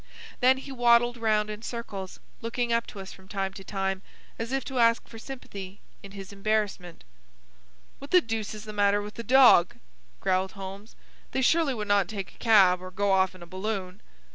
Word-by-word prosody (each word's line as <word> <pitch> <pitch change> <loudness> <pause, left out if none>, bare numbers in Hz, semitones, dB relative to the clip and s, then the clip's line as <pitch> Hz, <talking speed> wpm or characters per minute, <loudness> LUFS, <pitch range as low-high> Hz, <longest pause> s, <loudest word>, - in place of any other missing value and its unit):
Then 260 +1 +5
he 270 +1 -9
waddled 240 -1 +4
round 215 -2 +1
in 210 0 -7
circles, 205 -6 -6 0.2
looking 235 +1 -1
up 230 0 0
to 200 - -9
us 190 0 -8
from 190 0 -17
time 195 -1 -3
to 195 - -10
time, 195 -1 -2 0.4
as 230 +2 -4
if 270 -1 -1
to 265 -2 -3
ask 230 0 +3
for 225 - -11
sympathy 205 -7 -9 0.2
in 200 0 -12
his 195 0 -9
embarrassment. 200 -4 -2 1.0
"What 280 - -10
the 365 - +7
deuce 225 - -4
is 210 - -9
the 215 - -7
matter 205 0 +2
with 210 +1 -8
the 235 - -6
dog?" 245 -8 +6 0.4
growled 185 - 0
Holmes. 195 +2 -9 0.4
"They 265 - 0
surely 315 -1 +3
would 210 -2 -4
not 200 -3 +3
take 195 -2 -6
a - - -23
cab, 195 -6 +5
or 185 - -7
go 200 +2 0
off 190 -1 +2
in 180 - -12
a - - -9
balloon." 185 0 -5
210 Hz, 195 wpm, -27 LUFS, 195-235 Hz, 1.0 s, the